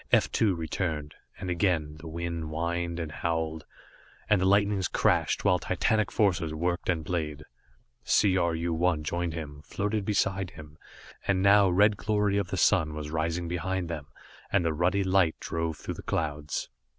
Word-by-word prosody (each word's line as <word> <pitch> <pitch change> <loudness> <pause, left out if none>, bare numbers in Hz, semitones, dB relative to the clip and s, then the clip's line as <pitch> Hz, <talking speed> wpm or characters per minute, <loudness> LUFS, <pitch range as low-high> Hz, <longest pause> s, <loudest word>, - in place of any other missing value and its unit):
F - - +4
2 105 -5 +2
returned, 80 -2 -3 0.2
and 90 -1 -4
again, 85 -4 0
the 80 - -9
wind 85 0 -4
whined 85 +2 -2
and 80 -3 -4
howled, 80 -1 -2 0.6
and 105 -3 +3
the 95 - +3
lightnings 100 -1 +3
crashed, - - +1
while - - +4
titanic 110 -1 +1
forces 85 -7 +1
worked 85 +2 -1
and 80 -3 0
played. 75 -4 -3 0.6
C 100 -3 +3
R 85 -3 +1
U 85 +1 -1
1 80 -2 +1
joined 85 +1 -2
him, 75 -3 -7
floated 105 +7 -2
beside 95 -2 0
him, 75 -2 -13 0.5
and 95 -1 +2
now 100 0 +6
red 100 +3 +4
glory 105 -1 +1
of 100 - -2
the 95 - -3
sun 80 -5 +3
was 75 -1 -5
rising 85 +2 -1
behind 90 +1 -2
them, 75 -4 -5 0.4
and 95 -4 +2
the 80 - +1
ruddy 90 +5 +1
light 95 -4 +3
drove 80 -1 -3
through - - -5
the - - -9
clouds. 75 -2 -2
85 Hz, 170 wpm, -28 LUFS, 80-95 Hz, 0.6 s, now